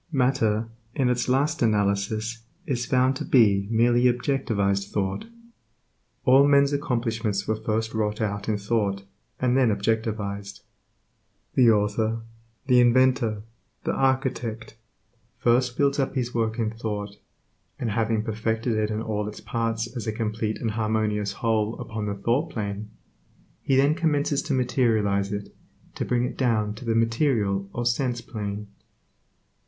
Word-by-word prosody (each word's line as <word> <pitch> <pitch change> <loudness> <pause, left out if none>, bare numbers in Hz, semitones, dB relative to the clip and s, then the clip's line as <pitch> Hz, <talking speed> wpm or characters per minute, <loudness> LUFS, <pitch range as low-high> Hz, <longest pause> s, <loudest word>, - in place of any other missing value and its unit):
Matter 125 -5 +1 0.3
in 130 -2 +2
its 125 0 0
last 145 +5 +1
analysis 110 +1 0 0.2
is 125 -6 -2
found 130 +1 +3
to - - -4
be 100 -6 +4
merely 120 +2 +3
objectivized 115 -6 +1
thought. 95 - -2 1.0
All 135 +2 +6
men's 140 0 +4
accomplishments 115 -7 -1
were 110 - +1
first 110 +1 -2
wrought 105 -1 -1
out 105 -1 -2
in 105 - +1
thought, 100 -2 -1 0.4
and 125 -1 +2
then 130 -3 +4
objectivized. 100 -1 -2 0.9
The 125 -3 +5
author, 110 +1 +1 0.4
the 125 -2 +5
inventor, 120 -3 +3 0.4
the - - -1
architect, 130 -5 -1 0.6
first 120 +1 +2
builds 140 0 +2
up 135 0 -1
his 125 -1 -1
work 115 -1 0
in 110 -2 0
thought, 105 -3 -5 0.6
and 115 -3 -2
having 110 0 0
perfected 110 +2 -1
it 110 0 0
in 110 +1 -2
all 105 -2 -2
its 105 - -7
parts 115 -2 -2
as 120 -2 -4
a - - +1
complete 110 0 -2
and 115 - -1
harmonious 105 -2 0
whole 110 -1 0
upon 110 -3 -4
the 100 - -2
thought 120 +11 0
plane. 105 -4 -4 0.7
he 135 - +1
then 140 +3 +4
commences 150 -4 +1
to 150 -3 -1
materialize 110 -6 +1
it, 100 -1 -5 0.4
to - - -3
bring 125 -1 +1
it 125 - -3
down 110 -5 +1
to 110 +4 -10
the 115 -1 +1
material 115 -4 +1
or 120 - -3
sense 120 0 0
plane. 105 -5 -5
115 Hz, 145 wpm, -25 LUFS, 105-125 Hz, 1.0 s, All